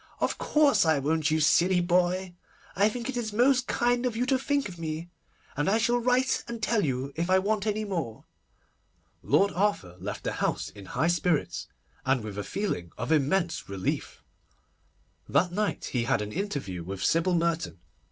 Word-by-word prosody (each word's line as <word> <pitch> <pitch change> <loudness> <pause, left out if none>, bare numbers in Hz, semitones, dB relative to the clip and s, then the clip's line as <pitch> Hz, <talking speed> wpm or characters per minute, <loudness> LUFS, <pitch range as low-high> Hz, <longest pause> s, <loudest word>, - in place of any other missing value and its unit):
'Of - - -1
course 285 -9 +4
I 160 -2 +3
won't, 150 +2 +1
you 155 +1 +2
silly 175 +4 +4
boy. 180 +1 +1 0.4
I 200 +2 +4
think 235 +2 -5
it 265 - -3
is 235 -3 -2
most 250 +3 +3
kind 245 0 +1
of 235 - -3
you 245 - +1
to 260 0 +2
think 280 0 0
of 175 -3 -10
me, 160 +1 -5 0.4
and 145 +5 +1
I 215 - +3
shall 240 +2 +2
write 250 +2 +2
and 235 -1 -5
tell 220 -1 +1
you 135 -1 -2
if 170 +3 -2
I 185 - +5
want 205 +2 0
any 215 0 0
more.' 165 - -4 1.0
Lord 200 0 +3
Arthur 180 - -1
left 100 +3 -5
the - - -1
house - - -1
in 100 -2 -12
high 160 +11 0
spirits, 175 -2 0 0.4
and 130 -3 +1
with 105 -1 -6
a - - -2
feeling 90 - -3
of 125 +5 -3
immense 160 - +1
relief. 95 -1 -3 1.1
That 175 0 +2
night 205 +2 -1
he 120 -2 +1
had 105 - +1
an 105 - -6
interview 140 - -3
with 95 +2 -5
Sybil 170 +2 +2
Merton. 165 - 0
175 Hz, 180 wpm, -28 LUFS, 145-215 Hz, 1.1 s, I